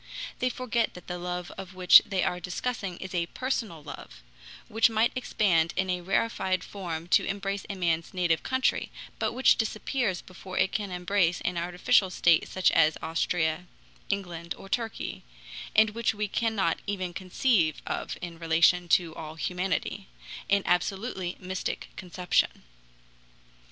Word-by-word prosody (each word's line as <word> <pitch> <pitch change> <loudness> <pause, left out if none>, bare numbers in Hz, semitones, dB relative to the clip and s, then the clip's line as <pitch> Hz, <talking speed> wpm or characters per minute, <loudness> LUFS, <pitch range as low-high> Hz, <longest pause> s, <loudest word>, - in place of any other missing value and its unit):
They 255 - +1
forget 240 -3 -1
that 180 - -11
the 180 0 -5
love 180 0 -4 0.2
which 180 -1 +8
they 195 -3 -1
are 180 - 0
discussing 185 +1 -3
is 190 0 -7
a 170 -1 0
personal 225 - -3
love, - - -10 0.4
which 225 +2 +4
might 225 +1 +2
expand 180 -9 +1
in 190 0 +1
a 180 0 -1
rarefied 190 0 0
form 170 -4 -5
to - - +5
embrace 200 0 -3
a 200 - -3
man's 170 -3 0
native 175 -3 +1
country, 260 0 0 0.3
but - - 0
which 260 +2 +4
disappears 220 -2 -1
before 185 0 -9
it 190 - +3
can 205 -2 -2
embrace 180 -1 +1
an 180 - -1
artificial 180 +2 +2
state 170 -2 +3
such 185 - +2
as 155 0 +4
Austria, 165 +1 0 0.4
England, 175 -4 -3
or - - -11
Turkey, 225 +2 -3 0.5
and 220 0 +6
which 225 0 0
we 210 0 -1
cannot 205 -5 0
even 185 -3 -2
conceive 185 -2 +1
of - - -3
in 170 -2 -6
relation 170 +2 +4
to 170 -1 +3
all 155 -1 -8
humanity, 185 +3 -2 0.4
an 200 -1 +3
absolutely 190 0 -1
mystic 185 0 -4
conception. 180 0 0
185 Hz, 145 wpm, -28 LUFS, 175-205 Hz, 0.5 s, which